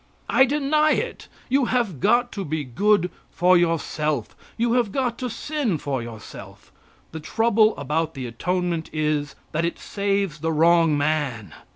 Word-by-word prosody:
I 265 - +6
deny 300 +2 +2
it. - - -3 0.2
You 270 0 +2
have 235 - -1
got 240 - +2
to 200 - -4
be 155 -2 -3
good 180 - +2 0.2
for 180 0 +3
yourself; 155 -6 0 0.2
you 235 0 +1
have 240 -5 +1
got 245 -1 -1
to 250 - -3
sin 265 - -2
for 140 -3 -3
yourself. 115 -3 -11 0.4
The 160 - -6
trouble 220 +5 +2
about 155 +3 -2
the 130 -2 -5
atonement 170 +7 -2
is, 150 -2 -1 0.2
that 165 +2 -1
it 170 - -1
saves 200 -5 -2
the 160 +2 -1
wrong 165 -1 +4
man. 145 - -1
170 Hz, 155 wpm, -23 LUFS, 150-230 Hz, 0.4 s, I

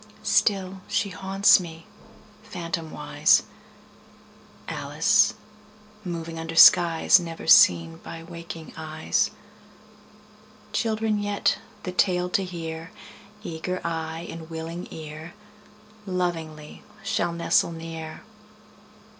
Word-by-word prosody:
Still 190 -2 +1
she 200 - 0
haunts 195 +2 +4
me, 165 -2 -9 0.6
phantomwise, 165 -2 0 1.2
Alice - - +2 0.7
moving 165 -2 -5
under 165 0 -6
skies 170 +3 +7
Never 165 -2 -7
seen 85 - +6
by 165 0 -9
waking 170 -1 -9
eyes. 155 -1 -1 1.4
Children 220 -1 0
yet, 205 0 0 0.2
the 180 - -4
tale 180 -1 +1
to 195 - +1
hear, 165 -2 -6 0.5
Eager 180 +1 -4
eye 165 0 -4
and 165 -1 -9
willing 165 +2 -6
ear, 160 +3 -9 0.7
Lovingly 165 -5 -4 0.2
shall 175 - 0
nestle 170 0 +1
near. 165 -1 -8
165 Hz, 90 wpm, -25 LUFS, 160-180 Hz, 1.4 s, skies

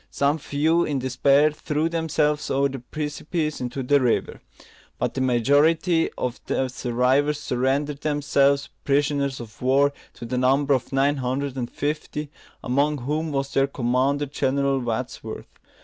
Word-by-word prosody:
Some 145 +3 +1
few 155 +4 +1
in 145 -4 -1
despair 140 +3 +3
threw 150 +1 -1
themselves 155 -3 0
over 140 +1 +2
the 135 0 -6
precipices 150 +4 -3
into 125 +2 -3
the 140 +2 +3
river; 125 -2 0 0.6
but - - -1
the 130 - -2
majority 145 +7 +3
of 125 -1 -3
the 130 - 0
survivors 130 +4 +1
surrendered 140 +2 -1
themselves 140 -1 +2
prisoners 140 -1 +1
of 115 -2 -11
war, 140 +3 +3 0.2
to - - -8
the 125 +2 -2
number 135 +2 +3
of 130 0 -1
nine 140 +2 +2
hundred 135 +1 -2
and 125 -3 -3
fifty, 150 0 -4 0.3
among 140 +4 +1
whom 150 +5 -2
was 135 -1 -2
their 135 0 +3
commander, 135 +2 0
General 140 0 0
Wadsworth. 120 -3 -5
140 Hz, 145 wpm, -24 LUFS, 130-150 Hz, 0.6 s, despair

